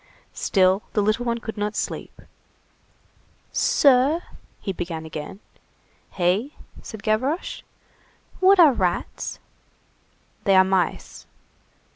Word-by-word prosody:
Still 190 0 +2
the 210 - +2
little 215 +4 0
one 235 -1 0
could 225 -1 -7
not 210 +1 -2
sleep. - - -5 1.3
"Sir?" 280 +4 +3 0.4
he 195 - -4
began 165 -2 -5
again. 160 +6 -8 0.7
"Hey?" 195 - 0 0.3
said 220 -2 -10
Gavroche. 255 +10 -1 0.8
"What 380 +1 +5
are 310 -6 +8
rats?" 180 -6 -2 1.1
"They 195 -2 +3
are 190 - +7
mice." 190 -2 -2
210 Hz, 100 wpm, -23 LUFS, 190-250 Hz, 1.3 s, are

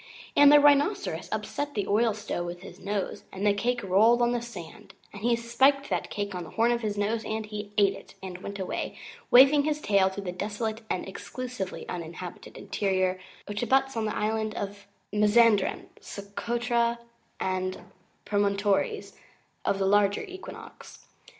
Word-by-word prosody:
And 290 0 +8
the 295 - +9
Rhinoceros 290 +6 +3
upset 290 0 -3
the 205 - 0
oil 220 +1 +2
stove 205 -5 -4
with 175 +1 -7
his 185 -1 -11
nose, 200 0 -3
and 195 +2 -4
the 205 - +5
cake 240 +3 -1
rolled 220 +6 +4
on 240 - +3
the 240 -1 -1
sand, 190 -9 -10 0.2
and 200 - -9
he 235 +1 +3
spiked 265 +4 +2
that - - -1
cake 205 -1 -3
on 180 -1 -4
the 160 - -10
horn 230 +5 +2
of 240 0 0
his 210 -2 -2
nose, 220 +2 0
and 220 0 -3
he 210 -1 -7
ate 200 -1 +5
it, - - -13
and 185 -1 -6
he 185 - -16
went 200 0 -5
away, 190 -2 -4 0.3
waving 275 +4 +8
his 300 0 0
tail, 200 -8 +3
to 190 - -7
the 190 -3 -4
desolate 215 +4 -3
and 185 - -2
Exclusively 245 0 -6
Uninhabited 170 +1 -7
Interior 185 -2 0 0.3
which 205 0 -4
abuts 270 +2 +2
on 225 -1 -1
the 215 - -2
islands 215 0 -1
of 200 0 -6 0.3
Mazanderan, 210 0 +4
Socotra, 235 +3 -1 0.4
and 185 0 -2 0.5
Promontories 205 - 0 0.5
of 195 - +1
the 195 - 0
Larger 200 0 +3
Equinox. 375 -2 -11
210 Hz, 170 wpm, -27 LUFS, 195-240 Hz, 0.5 s, the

